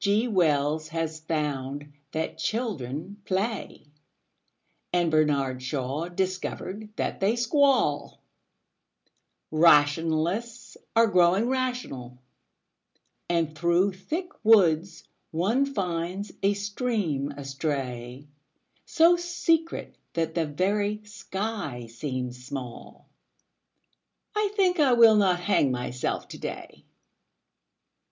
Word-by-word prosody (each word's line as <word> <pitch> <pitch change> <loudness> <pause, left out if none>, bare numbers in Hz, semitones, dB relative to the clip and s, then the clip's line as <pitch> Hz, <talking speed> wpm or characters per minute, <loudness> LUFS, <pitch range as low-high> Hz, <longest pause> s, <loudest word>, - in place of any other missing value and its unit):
G. 210 +4 +2
Wells 155 -6 +1
has 160 0 -3
found 145 -2 -3 0.2
that 160 0 -3
children 195 - -3
play, 200 0 -3 1.1
And 175 -2 +2
Bernard 140 -4 +1
Shaw 135 +4 -3
discovered 190 +3 -3
that - - -2
they 200 +4 +2
squall; 250 - +2 1.3
Rationalists 165 +8 +2 0.2
are 230 0 +6
growing 190 +2 +3
rational 245 - -3 1.1
And 165 -2 0
through 175 +4 +2
thick 320 - -4
woods 180 -6 +4 0.3
one 220 +12 +1
finds 185 -4 -3
a 200 +1 +2
stream 200 - -1
astray, 135 -2 -4 0.6
So 335 +2 +5
secret 345 -2 -1 0.2
that 165 -1 -1
the 165 -2 0
very 205 +7 0
sky 200 - -5
seems 125 +1 -5
small 130 -3 -8 1.3
I 420 -1 +1
think 370 -4 +2
I 275 -4 +5
will 230 -2 +7
not 185 -3 +3
hang 180 -6 +2
myself 125 0 -3
to - - -9
day. - - -7
175 Hz, 95 wpm, -27 LUFS, 145-215 Hz, 1.3 s, will